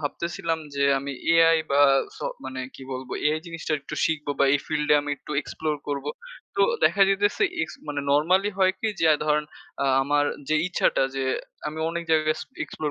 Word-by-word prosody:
ভাবতেছিলাম 165 +2 -2 0.2
যে 140 0 +1
আমি 140 +1 -5 0.4
Ai 165 - +4
বা 140 +1 +4 0.4
স - - -12 0.3
মানে 130 0 -5
কি 135 - -11
বলব 130 0 -6 0.2
এ - - +1
জিনিসটা 165 -1 -4
একটু 140 - -7
শিখব 155 -2 -1
বা - - +5
এই 145 - +4
ফিল্ডে 150 -1 +2
আমি 145 0 -5
একটু 150 - -14
এক্সপ্লোর 155 +1 -3
করবো। 145 0 -2 0.5
তো - - +4 0.2
দেখা 200 - +4
যাইতেছে 205 - +1 0.2
এক্স - - -4
মানে 145 -1 -2
নরমালি 180 +8 +3
হয় 185 0 +4
কি 220 - -1
যে - - +3
আ - - +5
ধরেন 150 0 +2 0.4
আ - - +1 0.2
আমার 145 +1 +2 0.2
যে 155 - +2
ইচ্ছাটা 180 -6 +1
যে 135 - -2 0.5
আমি 155 +1 -7
অনেক 170 0 -3
জায়গায় 155 -1 +3
এস - - -6 0.2
এক্সপ্লোর 150 -1 -4
150 Hz, 190 wpm, -25 LUFS, 145-165 Hz, 0.5 s, বা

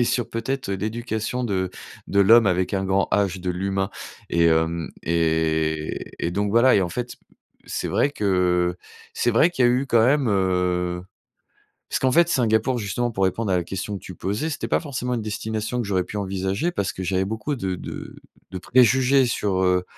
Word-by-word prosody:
et - - +4
sur 120 -1 0
peut-être 130 +1 -3
l'éducation 110 +4 -3
de 95 -4 -1 0.4
de 100 - +2
l'homme 115 +3 +6
avec 90 -1 +1
un 95 -1 0
grand 95 +1 +1
H, 95 -3 +1
de 90 - -2
l'humain. 95 +2 -2 0.4
Et 85 0 +3
hem 80 0 +1
et 80 -1 0
et - - -1
donc 100 +3 -1
voilà. 120 +4 +5
Et - - +4
en 90 - 0
fait, 120 +7 -5 0.5
c'est - - -3
vrai 145 - +2
que 90 -6 +1 0.4
c'est 120 - +1
vrai 120 +9 +4
qu'il 150 -8 +1
y - - +5
a - - +4
eu 130 +2 +1
quand 115 -3 +4
même, 135 0 +3
heu 90 -2 0 0.9
parce - - -1
qu'en 130 - +2
fait 170 0 +5
Singapour, 120 -1 +2
justement, 120 +3 -2
pour 95 -4 0
répondre 95 +2 0
à 90 - +3
la 90 - -1
question 95 +3 -4
que - - -23
tu 95 - -9
posais, 105 - -2
c'était 150 - -4
pas - - +2
forcément 125 -5 -4
une 120 - 0
destination 110 +2 -3
que 115 - -3
j'aurais 95 -2 0
pu 105 - -8
envisager 95 - -2
parce 100 - -1
que 95 - -6
j'avais 95 +1 0
beaucoup 110 +7 -3
de 95 -7 -3
de - - -8 0.3
de 95 - -5
préjugés 130 +5 +4
sur, 100 -5 0
heu, 90 0 +2
100 Hz, 200 wpm, -23 LUFS, 90-120 Hz, 0.9 s, l'homme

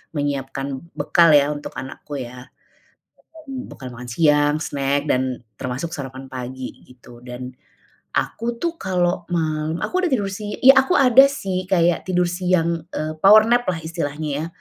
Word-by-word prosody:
menyiapkan 135 -1 -3 0.2
bekal 165 +3 +4
ya, 145 +1 +2
untuk 145 - -8
anakku 140 +2 -7
ya. 125 0 -8 1.0
Bekal 255 - -7
makan 125 0 -9
siang, 150 +1 +3
snack 140 0 -1
dan 130 -1 0 0.2
termasuk 130 +6 -4
sarapan 135 -3 -8
pagi, 130 0 -6 0.2
gitu. 125 -1 -16
Dan, 125 0 -7 0.7
aku 235 +1 -2
tuh 340 -1 -2
kalau 180 - -1
malam, 155 -1 -1
aku 370 0 -1
udah 355 - +1
tidur 205 -6 +1
si 205 +1 -6
ya 265 +1 +8
aku 360 - -1
ada 265 +1 +7
sih 195 -10 -2
kayak 175 -2 +2
tidur 180 -1 +1
siang, 175 -2 0
eee, 155 +1 -3
power 215 +2 +8
nap 240 +1 +3
lah, 165 - -3
istilahnya 155 -2 -4 0.2
ya. - - -4
155 Hz, 150 wpm, -21 LUFS, 135-185 Hz, 1.0 s, ya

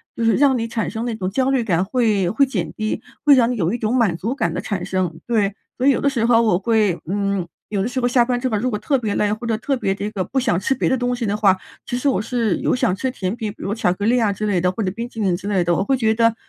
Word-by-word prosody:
就 230 - -1
是 225 - +4
让 275 -2 +4
你 230 -1 -2
产 225 -1 -2
生 225 +1 -4
那 235 -2 -2
种 185 -4 -3
焦 260 +6 +1
虑 265 -3 +2
感， 180 -5 +1
会 210 -5 +1
会 275 +8 +3
减 185 -12 -3
低， 215 0 -3 0.2
会 295 - +7
让 245 -3 +4
你 250 - -1
有 175 -6 0
一 - - -1
种 225 +1 -1
满 220 -9 +2
足 225 +9 -3
感 170 - -1
的 - - -2
产 195 -2 -3
生。 185 -4 -2
对， 210 -4 +1 0.2
所 255 - +1
以 - - +7
有 - - 0
的 280 - +3
时 240 -5 0
候 230 -1 +5
我 215 -6 +2
会 210 -4 +1
嗯， 200 -1 -1 0.2
有 205 -2 -1
的 200 - 0
时 250 +1 -2
候 245 - +1
下 245 0 +4
班 245 0 0
之 260 - -1
后， 215 - 0
如 245 +5 0
果 210 - -2
特 270 +6 +1
别 220 -5 -2
累， 205 -1 +1
或 220 +3 -6
者 225 -1 0
特 275 +5 -1
别 195 -6 -1
这 205 +1 -3
个 195 -3 -2
不 265 - -1
想 230 -8 +1
吃 265 - 0
别 - - 0
的 260 - +2
东 245 0 -1
西 240 -1 -3
的 205 -1 0
话， 200 -3 +3 0.3
其 245 - -3
实 250 - -1
我 255 - +1
是 230 -2 0
有 - - +1
想 185 -7 +1
吃 260 +6 -2
甜 195 -4 -3
品， 220 -3 -4
比 - - -15
如 200 - -2
巧 200 -5 +1
克 200 +2 -4
力 240 +3 +3
啊 215 -3 +2
之 205 +2 -3
类 195 -4 +1
的， 180 +1 +2
或 205 - -5
者 190 - 0
冰 230 +4 -5
淇 225 - -9
淋 190 -4 +1
之 190 +3 -7
类 190 -3 +2
的。 175 0 +1
我 190 - +1
会 265 +5 +1
觉 220 -3 +2
得， 230 0 +3
220 Hz, 345 characters per minute, -21 LUFS, 195-245 Hz, 0.3 s, 会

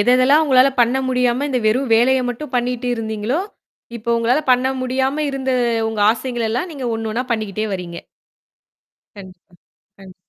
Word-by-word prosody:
எததெல்லாம் 255 +7 +4
உங்களால 265 -2 +5
பண்ண 240 +2 +3
முடியாம 250 +1 +1
இந்த 255 - 0
வெறும் 250 +4 +1
வேலைய 255 +3 +3
மட்டும் 255 +3 -6
பண்ணிட்டு 245 0 -2
இருந்தீங்களோ! 220 +5 -2 0.6
இப்ப 235 +1 -2
உங்களால 235 +5 +1
பண்ண 250 +1 +2 0.2
முடியாம 265 +2 -1
இருந்த 265 -1 -3 0.4
உங்க 220 -1 -4
ஆசைகள் 235 0 -3
எல்லாம் 255 +10 -2
நீங்க 270 -4 -5
ஒண்ணு 225 -1 -4
ஒண்ணா 245 +3 -2
பண்ணிக்கிட்டே 215 -1 -3
வர்றீங்க. 175 -2 -5 1.2
கண்டிப்பா. 185 -3 -14 0.4
கண்டிப் 190 -2 -14
245 Hz, 145 wpm, -19 LUFS, 220-260 Hz, 1.2 s, உங்களால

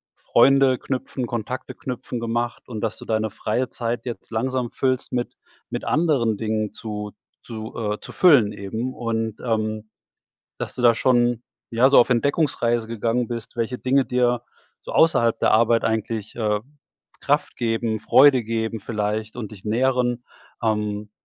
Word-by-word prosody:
Freunde 135 -2 +4
knüpfen, 130 -1 -3
Kontakte 120 +2 -4
knüpfen 125 -1 -5
gemacht 120 +1 -2
und 110 -3 -5
dass 115 -2 -2
du - - -10
deine 110 0 0
freie 120 +4 -2
Zeit 120 0 -3
jetzt 120 - -6
langsam 125 +2 -1
füllst 130 -1 -1
mit 120 -1 -2 0.4
mit - - -4
anderen 135 -10 +2
Dingen 110 -2 -1
zu 105 -2 -6 0.3
zu, 110 -1 -7
äh 105 -2 -2
zu - - -9
füllen 130 - +5
eben. 110 +6 -4
Und, 115 -3 -2
ähm, 110 -2 -2 0.7
dass - - -5
du 125 - -4
da 120 - +7
schon, 120 -2 +2 0.3
ja, 125 +4 +4
so 140 - +6
auf 120 - +4
Entdeckungsreise 120 -3 +1
gegangen 115 +1 -1
bist, 115 -1 -6
welche 115 +2 -2
Dinge 135 +1 +2
dir 125 -1 +1 0.4
so - - -7
außerhalb 120 -8 +3
der - - +3
Arbeit 115 +1 +4
eigentlich, 110 -1 -2
äh, 105 -3 0 0.6
Kraft - - 0
geben, 115 -1 0
Freude 130 +2 +6
geben 110 0 -2
vielleicht 105 +1 -3
und 115 -3 -6
dich 105 0 -12
nähren. 125 +1 +1 0.4
Ähm, 105 -1 -1
115 Hz, 155 wpm, -23 LUFS, 110-125 Hz, 0.7 s, da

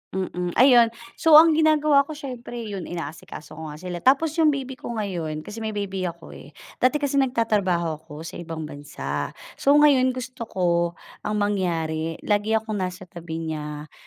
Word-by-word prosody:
Mm, 180 -2 -3
ayun 245 -2 +7 0.3
so 320 -2 +6
ang 325 +2 +9
ginagawa 305 -2 +4
ko 310 - -6
siyempre 250 -5 -7
yun 200 -5 -5
inaasikaso 160 -2 -8
ko 160 - -6
nga 150 - -7
sila 175 +2 -6
tapos 275 - +3
yung 320 - +5
baby 265 -1 -6
ko 235 - -5
ngayon 170 -8 -3
kasi 210 +6 -8
may 220 -1 -4
baby 195 -2 -2
ako 170 - -9
eh. - - -13 0.2
Dati 255 +3 +3
kasi 285 -2 +1
nagtatrabaho 200 - +1
ako 150 +2 -9
sa 165 - -8
ibang 165 -2 -6
bansa. 145 -1 -5 0.2
So 280 +1 +4
ngayon, 270 -4 +5
gusto 255 -2 -6
ko 185 -4 -2 0.6
ang 210 - -1
mangyari, 165 -6 -1
lagi 210 +1 +1
akong 220 -1 -2
nasa 185 0 -4
tabi 165 -2 -6
niya. 150 -1 -6
205 Hz, 170 wpm, -24 LUFS, 165-255 Hz, 0.6 s, ang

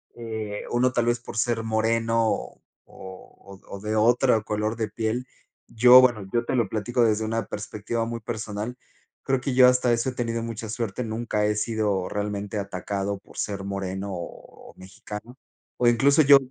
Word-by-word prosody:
eh, 110 -3 -5
uno 125 +1 +2
tal 120 -2 +1
vez 120 0 +2
por 120 - -10
ser 115 0 0
moreno 115 +1 +1
o - - -5 0.2
o 95 +1 -13
o 100 - -7
de 105 +2 -3
otro 115 +1 +3
color 105 +1 -2
de 110 -1 -2
piel. 115 +3 -2 0.4
Yo 125 +2 +8
bueno, 120 -6 +3
yo 120 0 0
te - - -1
lo 115 -5 +1
platico 120 +4 -1
desde 110 -1 +2
una 115 +1 -2
perspectiva 105 +2 -4
muy 115 0 -4
personal. 110 +1 -5 0.5
Creo 135 -2 0
que 135 0 -2
yo 125 0 +7
hasta 125 -1 +3
eso 115 +2 +1
he - - -6
tenido 115 -2 -2
mucha 115 -1 -6
suerte, 115 +1 -3
nunca 110 -1 -1
he 105 0 +1
sido 105 -4 0
realmente 105 0 -3
atacado 100 0 -3
por - - -18
ser 100 -2 -3
moreno 100 0 -4
o 85 -2 -10
mexicano 105 +6 -10 0.4
o 120 - +2
incluso 140 +6 +5
yo, 140 -1 +8
110 Hz, 175 wpm, -25 LUFS, 105-120 Hz, 0.5 s, Yo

